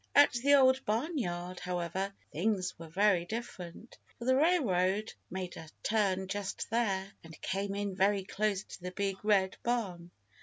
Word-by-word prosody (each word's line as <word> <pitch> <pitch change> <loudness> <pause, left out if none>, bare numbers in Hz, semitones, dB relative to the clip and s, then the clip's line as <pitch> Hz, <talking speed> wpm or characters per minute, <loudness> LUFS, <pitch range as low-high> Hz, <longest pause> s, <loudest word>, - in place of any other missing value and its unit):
At 285 0 +7
the 275 +4 +4
Old 265 -1 +5
Barnyard, 210 - -2
however, 180 +2 -2 0.2
things 185 +1 0
were 165 - -8
very 190 0 +3
different, 215 -1 -7 0.2
for 235 - -7
the 260 +1 +4
railroad 215 - +2 0.2
made 185 -1 -5
a 160 - -9
turn 195 -3 +1
just 200 0 -3
there 195 -4 0
and 160 -1 -12
came 195 +1 -1
in 200 -1 -2
very 195 +1 +3
close 205 0 -1
to - - -11
the 180 - -4
Big 195 +1 -2
Red 195 -3 +3
Barn. 195 -8 -2
195 Hz, 155 wpm, -32 LUFS, 185-225 Hz, 0.2 s, At